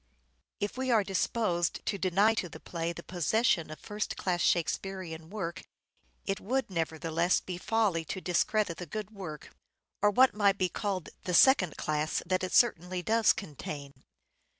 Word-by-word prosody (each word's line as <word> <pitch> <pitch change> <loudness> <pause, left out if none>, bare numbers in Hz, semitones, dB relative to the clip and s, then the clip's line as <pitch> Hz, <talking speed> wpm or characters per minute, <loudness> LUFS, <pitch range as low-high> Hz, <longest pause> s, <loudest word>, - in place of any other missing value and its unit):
Quality - - +1
of 205 - -5
If - - -16
we 260 0 -1
are 225 -4 +4
disposed 190 -2 0
to 200 - -1
deny 195 +4 +3
to 185 -5 -2
the - - -10
play 170 -1 -3
the 170 0 -8
possession 180 - +1
Tempest." 155 - -10
of - - -14
first 210 0 -3
class 175 -2 -1
Shakespearean 170 -2 -1
work 185 -5 -4 0.6
it 195 +1 -1
would 260 +4 -1
neverthe 165 -2 -3
less 170 +3 +3
be 180 -1 -6
folly 205 -6 +1
to 185 - -4
discredit 185 +1 +1
the 180 - -7
good 215 +4 -5
work, 180 -8 -8 0.5
of 205 -1 +2
what 260 +1 +7
might 200 -2 +3
be 185 -2 +1
called 195 -5 -3 0.2
the 180 - 0
second 185 - +5
class, 155 0 -1
that 185 +1 0
it 185 - -2
certainly 180 -6 +2
does 225 +4 +4
contain. 145 -5 -6
185 Hz, 175 wpm, -30 LUFS, 170-210 Hz, 0.6 s, what